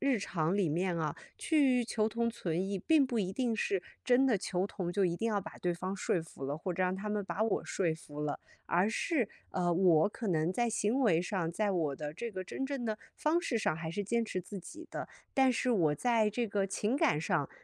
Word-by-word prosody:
日 270 -4 +2
常 175 -1 0
里 180 -7 +2
面 175 +2 0
啊， 155 -2 -1 0.2
去 265 -6 +3
求 220 -1 0
同 235 +1 0
存 185 -6 -2
异， 195 0 -2
并 290 - +4
不 240 -3 -1
一 190 -2 -1
定 245 -3 0
是 195 -3 0 0.2
真 255 +1 +4
的 230 -6 +3
求 190 0 -1
同， 185 -4 -4
就 195 +2 +2
一 175 -2 +1
定 225 +6 -1
要 210 - +1
把 - - -9
对 175 -1 0
方 185 +3 -3
说 175 -3 0
服 140 -4 -9
了， 145 +2 -2
或 180 +3 -3
者 185 - 0
让 185 +1 +1
他 210 +2 -4
们 210 -1 0
把 200 +2 -2
我 220 -2 +1
说 175 -4 +1
服 150 -2 -9
了。 150 -1 -2 0.2
而 180 +4 +2
是， 240 - 0 0.2
呃， 175 -1 +1
我 175 -1 +5
可 225 +2 -6
能 160 -1 +2
在 235 +4 +1
行 225 +4 +1
为 175 -10 +4
上， 180 -3 -2
在 205 +3 +1
我 155 -7 0
的 150 0 -5
这 235 +7 -4
个 190 -3 -4
真 225 +8 -4
正 270 -2 -3
的 215 0 -2 0.2
方 310 +3 +2
式 250 -9 -1
上， 155 - 0
还 160 0 -4
是 205 +5 -2
坚 230 +3 +1
持 185 - -3
自 195 +2 -7
己 325 - -10
的。 - - -4 0.3
但 265 -1 +5
是 250 +1 0
我 165 -9 +3
在 225 - +2
这 235 +2 -1
个 200 -1 0
情 210 +6 0
感 280 - +3
上， 165 -5 0
200 Hz, 260 characters per minute, -32 LUFS, 175-235 Hz, 0.3 s, 我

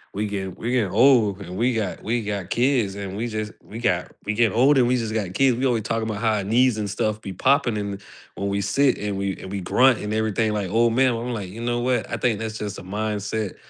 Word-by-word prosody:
we 105 +1 -1
gettin 95 -2 -4
we 120 +2 -3
getting 115 -7 +1
old 110 -4 +4
man 90 -1 -8
we 120 +4 +1
got 105 -5 -2
we 115 +1 -1
got 100 -3 -4
kids 120 -6 +1
and 100 -1 -6
we 120 +2 -2
just 110 -1 -4
we 110 - -10
got 90 -7 0
we 105 - -1
getting 115 -1 +2
old 135 +3 +5
and 120 - +4
we 125 - +2
just 110 -2 -3
got 100 -5 -2
kids." 135 -3 +4
We 135 - 0
always 115 -4 0
talk 115 +1 -1
about 110 -2 -3
how 110 0 +1
our 100 - -2
knees 120 +3 +3
and 105 -1 -2
stuff 110 +1 -1
be 95 - -6
popping 125 0 +2
and 100 -1 -4
th - - -20 0.3
when 100 - -3
we 100 0 -1
sit 130 +7 +2
and 105 -1 -3
we 100 -1 -2
and 95 - -8
we 100 -1 -3
grunt 125 +6 +4
and 105 +1 -4
everything 110 0 0
like, 100 -3 -2
"Oh, 115 +1 +4
man." 130 +2 +3
I'm 120 +1 -3
like, 100 -5 -5
you 115 +5 -9
know 120 0 -1
what? 125 -2 0
I - - -2
think 115 -4 0
that's 110 0 -4
just 105 0 -5
a - - -10
mindset," 105 +1 -3
110 Hz, 265 wpm, -23 LUFS, 100-120 Hz, 0.3 s, old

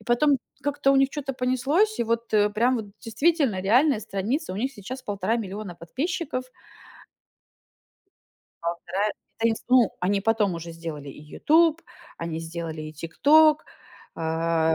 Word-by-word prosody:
И - - -18
потом 270 +4 +3 0.2
как-то 285 -1 +1
у - - +4
них 270 0 +4
чё-то 275 -2 -4
понеслось, 265 - +1
и - - +2
вот, 230 0 -2
э, 210 0 +4
прям 240 +5 +2
вот 220 -3 -4
действительно 265 - +1
реальная 250 +5 +3
страница, 220 - -2
у 185 - -5
них 260 +6 -2
сейчас 250 +3 -8
1,5 205 0 -1
миллиона 205 -4 -5
подписчиков. 260 - -3 2.2
1,5 175 +4 -2 0.3
Они 225 0 +2
с - - -11
Ну, 250 -4 +5
они 195 +3 +1
потом 210 -3 +1
уже 170 0 -7
сделали 160 -4 -7
и 140 - -10
"Ютуб", 320 - +2 0.4
они 165 -1 -4
сделали 165 -1 -5
и 155 0 -7
"Тикток". 300 - +4 0.5
А, 160 0 +1
220 Hz, 145 wpm, -25 LUFS, 170-270 Hz, 2.2 s, Ну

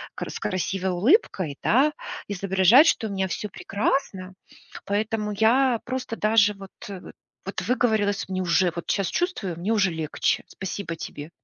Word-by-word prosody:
кр - - -5
с - - -6
красивой 185 +1 -2
улыбкой, 185 - +2
да, 280 +6 +3 0.4
изображать, 195 - +5
что 225 - +2
у - - -6
меня 190 -1 -1
всё 210 +3 -4
прекрасно. 195 -1 -2 0.5
Поэтому 210 +1 -1
я 235 +4 +3
просто 255 -2 -4
даже 215 -1 +4
вот, 195 -1 -11 0.2
э, 190 -2 -7 0.4
вот 195 - -4
выговорилась, 215 -3 0
мне 185 0 -2
уже 180 0 +2
вот, 170 - -6
щас 195 -3 0
чувствую, 285 - -2
мне 185 +6 -2
уже 195 -4 +2
легче. 160 -2 -1
Спасибо 190 -2 -5
тебе. 150 -1 -8
200 Hz, 150 wpm, -25 LUFS, 185-225 Hz, 0.5 s, изображать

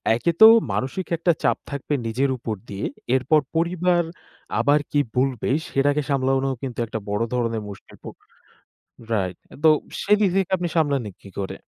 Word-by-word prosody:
একে 170 +8 +1
তো 220 - +12 0.3
মানসিক 135 +8 -3
একটা 170 +2 +2
চাপ - - +2
থাকবে 140 +1 -3
নিজের 130 +5 0
উপর 110 -2 -4
দিয়ে। 100 0 -4 0.3
এরপর 145 +4 +3
পরিবার 175 +1 +2 0.6
আবার 145 +1 +4
কি 145 - +2 0.2
বলবে 130 -3 0 0.2
সেটাকে 145 +2 +1
সামলানো 135 0 +1
কিন্তু 125 -3 -5
একটা 110 0 -5
বড় 105 +3 0
ধরণের 115 -3 -1
মুশকিল। 100 - -12
তো - - -9 1.1
রাইট 95 -4 -1 0.3
তো - - +8 0.3
সেদিক 210 -1 +3
থেকে 190 -1 +1
আপনি 175 -1 -2
সামলান 140 -9 +1
কী 100 - -12
করে? 95 - -4
135 Hz, 155 wpm, -23 LUFS, 115-165 Hz, 1.1 s, তো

